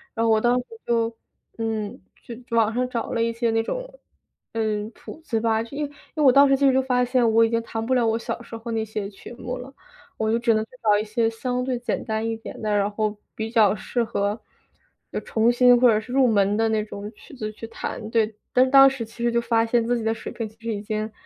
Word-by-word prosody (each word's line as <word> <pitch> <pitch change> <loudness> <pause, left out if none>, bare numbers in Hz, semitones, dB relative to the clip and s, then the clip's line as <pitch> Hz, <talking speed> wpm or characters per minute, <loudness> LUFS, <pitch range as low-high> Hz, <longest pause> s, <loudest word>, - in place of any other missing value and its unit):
然 230 0 +1
后 225 - +3
我 220 0 +3
当 240 +2 +3
时 250 - -3 0.2
就， 230 -1 +1 0.4
嗯， 220 -2 -3 0.2
就 235 - -8 0.2
网 220 -1 +3
上 250 +1 -1
找 235 -2 -3
了 230 - 0
一 230 0 +1
些 230 0 0
那 225 0 +2
种， - - -5 0.5
嗯， 215 -2 -1
谱 325 - -11
子 230 -8 -1
吧， 220 -1 +1
就 235 +5 -8
因 300 - -1
为 - - -8
因 - - -20 0.2
为 305 - +1
我 265 - +8
当 280 +2 +6
时 270 - +4
其 280 - +2
实 270 - +5
就 265 - +3
发 250 -1 +1
现， 245 -2 +2
我 225 +1 +5
已 - - 0
经 230 0 +1
弹 225 -1 -5
不 260 - 0
了 245 -2 +3
我 225 0 +1
小 230 - -5
时 230 -1 -8
候 230 +1 -7
那 225 -1 0
些 215 -2 -4
曲 195 - -12
目 250 +1 -5
了。 255 +2 -9 0.5
我 220 0 0
就 230 - +2
只 235 -1 +3
能 215 - +1
去 - - -48
找 210 -2 +4
一 210 - -1
些 225 +1 0
相 250 +2 -2
对 255 -1 -1
简 245 - -3
单 220 0 -2
一 225 - -1
点 225 - -9
的， 210 -1 0
然 205 0 +2
后 210 0 -2 0.2
比 220 0 -3
较 215 -3 +4
适 235 +4 -2
合， 210 -1 -1 0.7
要 - - -2
重 225 +1 +2
新 245 0 +5
或 250 - +6
者 215 -2 +4
是 220 +3 -10
入 265 -1 +4
门 205 -2 +3
的 225 0 +2
那 215 -1 +1
种 205 0 -7
曲 - - -16
子 215 -5 -5
去 215 - -9
弹。 225 0 -6
对， 220 -1 +2 0.2
但 255 +1 +4
当 275 0 +9
时 270 -3 -1
其 230 +1 -8
实 240 - +2
就 235 0 +1
发 230 -1 +2
现 235 0 +2
自 245 +1 +1
己 230 - -4
的 225 0 +1
水 225 - -7
平 230 - -4
其 215 - -18
实 230 0 -3
已 205 - -4
经， 215 +1 -3
230 Hz, 290 characters per minute, -24 LUFS, 220-245 Hz, 0.7 s, 当